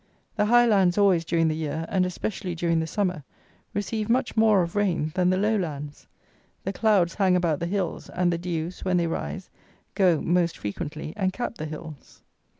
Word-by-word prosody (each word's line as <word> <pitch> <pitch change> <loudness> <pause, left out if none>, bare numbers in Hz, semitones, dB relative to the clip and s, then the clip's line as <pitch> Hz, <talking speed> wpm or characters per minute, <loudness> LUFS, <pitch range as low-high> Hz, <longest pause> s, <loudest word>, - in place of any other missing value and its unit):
The 210 - +1
high 240 +2 +6
lands 195 -5 +3
always, 195 -5 +4
during 165 0 +1
the 155 - 0
year, 160 +1 -3
and 185 -2 +1
especially 180 0 -4
during 170 -1 +1
the 160 - -2
summer, 180 -4 -1 0.5
receive 210 +1 -2
much 250 +3 +1
more 215 -4 +4
of 170 +2 -6
rain 180 -7 0
than 180 -1 +2
the 185 - +2
low 210 +3 +2
lands. 150 -6 -5 0.6
The 195 - -3
clouds 200 -7 +2
hang 190 -3 +2
about 170 -4 +1
the 170 - -2
hills, 185 -2 -3
and 175 -1 +1
the 170 - -2
dews, 170 0 -4
when 185 -1 +1
they 170 - +2
rise, 180 +3 -4 0.4
go, 180 -6 +3
most 175 0 +1
frequently, 150 +9 -5
and 190 -3 0
cap 240 +2 -5
the 155 - -3
hills. 155 -2 -10
180 Hz, 190 wpm, -25 LUFS, 165-200 Hz, 0.6 s, high